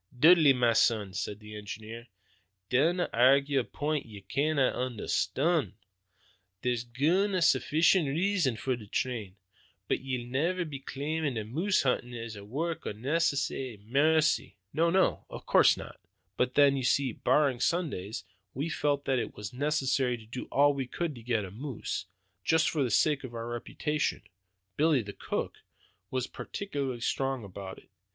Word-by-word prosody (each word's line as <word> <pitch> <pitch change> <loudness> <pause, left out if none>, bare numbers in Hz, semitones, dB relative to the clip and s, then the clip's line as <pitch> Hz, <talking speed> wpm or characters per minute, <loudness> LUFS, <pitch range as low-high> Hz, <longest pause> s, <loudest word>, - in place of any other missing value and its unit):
"Dudley, 160 -1 +7
ma 120 -3 +3
son," 110 -4 +2
said 100 +1 -4
the 105 0 -10
engineer, 110 +3 -8 0.6
"dinna 165 +8 +3
airgue 135 +4 +4
a - - 0
point 150 +4 -2
that - - -16
ye 105 -2 -10
canna 140 +4 +1
understond. 135 +6 0 0.9
There's 120 -2 0
guid 165 - +1
an' - - +2
suffeecient 160 +2 +3
reasons 160 - +1
for 130 -1 0
the 110 -3 -11
train. 110 -4 -3 0.5
But - - +1
ye'll 130 -2 -4
ne'er 165 +9 0
be 145 -4 -6
claimin' 145 +1 -3
that 110 -2 -3
moose 170 - +1
huntin' 125 -2 -1
is 115 -1 -6
a 100 - -9
wark 155 +10 -3
o' - - -2
necessity 135 0 -1
or - - -18
maircy?" 150 +9 +2 0.2
"No, 165 +3 +3
no, 190 +2 +2
of - - -9
course - - +5
not; - - -9 0.4
but 125 +3 0
then, 140 -1 +6
you 135 - -2
see, 130 +1 +2
barring 135 +2 +2
Sundays, 130 - -1 0.3
we 145 +6 -2
felt 145 -2 0
that 130 -2 +1
it - - -4
was 105 +1 -7
necessary 135 -2 +1
to 110 - -14
do 120 +3 -6
all 145 +1 +3
we 135 -2 -3
could 170 +3 -3
to 120 - -11
get 115 -3 -1
a 95 - -9
moose, 115 -5 -5 0.4
just 160 +2 +3
for 155 - -1
the 125 - 0
sake 145 +5 +2
of 120 -2 -8
our 115 0 -4
reputations. 145 +5 -2 0.5
Billy, 150 -5 +3
the 100 0 -8
cook, - - -4 0.5
was 130 -1 -1
particularly 140 -12 -5
strong 135 0 -1
about 95 -1 -8
it. - - -19
135 Hz, 165 wpm, -29 LUFS, 115-155 Hz, 0.9 s, Dudley